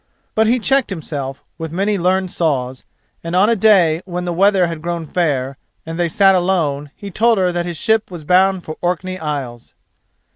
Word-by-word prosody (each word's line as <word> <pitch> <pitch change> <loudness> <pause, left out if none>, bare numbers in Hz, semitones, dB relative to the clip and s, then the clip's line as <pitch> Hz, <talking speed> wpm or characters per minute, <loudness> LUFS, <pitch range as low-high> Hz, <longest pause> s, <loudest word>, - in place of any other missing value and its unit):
But 220 0 +2
he 240 +3 +3
checked 265 +2 +1
himself 145 -7 -5 0.2
with 160 -1 -5
many 200 +5 0
learned 185 0 0
saws, 130 -6 -2 0.4
and 165 +1 -3
on 200 +5 +4
a - - +3
day 185 -6 +4
when 180 -1 -4
the 175 - -2
weather 195 +1 +3
had 165 -2 -5
grown 170 -1 -3
fair, 140 -6 -1 0.3
and 165 +1 -6
they 170 -1 +1
sat 195 +3 +4
alone, 165 -6 0
he 200 -1 -9
told 230 +4 +2
her 185 -2 +2
that 175 0 -2
his 170 -2 -4
ship 220 +5 +1
was 175 -4 -8
bound 185 +3 +3
for 155 - -7
Orkney 180 +1 -2
Isles. 135 -6 -5
175 Hz, 190 wpm, -18 LUFS, 155-195 Hz, 0.4 s, on